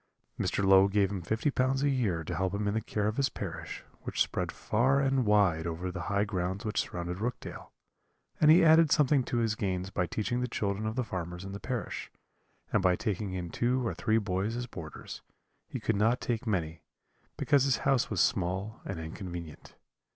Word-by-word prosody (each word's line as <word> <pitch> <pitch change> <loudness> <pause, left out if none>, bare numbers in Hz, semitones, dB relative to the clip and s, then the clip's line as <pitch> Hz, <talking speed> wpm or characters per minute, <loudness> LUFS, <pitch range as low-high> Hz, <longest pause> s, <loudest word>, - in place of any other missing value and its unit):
Mr. 100 - 0
Low 95 0 +7
gave 100 -1 +2
him 95 -3 -3
fifty 110 - 0
pounds 135 +1 +1
a 145 - +3
year 100 -11 0
to - - -4
help 95 +1 -1
him 105 0 -1
in 100 - +1
the 110 - 0
care 105 -2 -1
of 110 - -2
his 140 -1 +2
parish, - - -6 0.2
which - - -5
spread - - -3
far 130 +5 +2
and 135 -3 +1
wide 95 -6 +3
over 85 +2 -3
the 90 -1 -5
high 100 0 +2
grounds 95 +1 -2
which 105 - +1
surrounded 90 +1 -5
Rookdale; 120 +4 -5 0.7
and 150 - +6
he 165 +2 +7
added 160 -1 +6
something 145 -3 +4
to 120 - -2
his 115 -2 +1
gains 95 -3 -2
by 90 -3 0
teaching 120 +7 -1
the 125 - 0
children 105 -2 -2
of 110 - -3
the 130 - 0
farmers 90 -4 -5
in 95 - -6
the 100 - -6
parish, 125 -2 -4 0.6
and - - +4
by 90 -1 +4
taking 105 -2 -2
in 90 -2 -4
two 125 +1 0
or - - -1
three 110 +1 +1
boys 100 +1 -1
as 120 0 -3
boarders; 85 -10 -8 0.5
he - - -5
could 115 - 0
not 115 +5 +2
take 120 0 -2
many, 85 -6 -1 0.6
because 140 -3 +3
his 135 -4 +2
house 135 -3 +3
was - - -1
small 95 0 0
and 95 -4 -5
inconvenient. 85 -1 -7
105 Hz, 200 wpm, -30 LUFS, 95-125 Hz, 0.7 s, Low